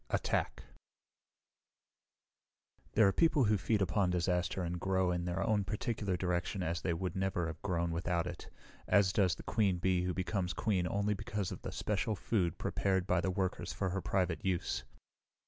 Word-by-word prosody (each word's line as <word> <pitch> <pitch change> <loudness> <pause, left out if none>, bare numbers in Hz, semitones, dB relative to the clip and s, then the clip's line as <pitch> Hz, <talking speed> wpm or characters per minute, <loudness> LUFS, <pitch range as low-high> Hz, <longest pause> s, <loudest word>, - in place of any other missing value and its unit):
Attack - - -1 2.3
There 110 -2 +6
are - - +4
people 160 -4 +4
who 105 -1 +4
feed 105 +2 +1
upon 95 +1 +1
disaster 90 0 0
and 85 +1 -3
grow 95 0 +1
in 90 0 -1
their 90 +2 -1
own 105 -2 +2
particular 105 -1 -2
direction 90 +1 -1
as 85 0 -1
they 90 - 0
would 85 +1 -2
never 95 -2 0
have 80 0 -6
grown 85 -3 0
without 85 +1 0
it, 90 -1 -7 0.4
as 100 -2 +4
does 95 -5 +3
the - - -10
queen 100 -5 +1
bee 90 0 +2
who 90 0 -1
becomes 90 0 -1
queen 95 -5 0
only 100 +3 0
because 100 -1 -3
of - - -7
the - - -5
special 105 +1 -1
food 90 -2 0
prepared 95 -2 0
by 90 -2 +2
the 95 - 0
workers 95 0 -2
for 95 - -1
her 95 +1 -2
private 90 -2 0
use. 95 -3 -1
95 Hz, 175 wpm, -34 LUFS, 90-100 Hz, 2.3 s, There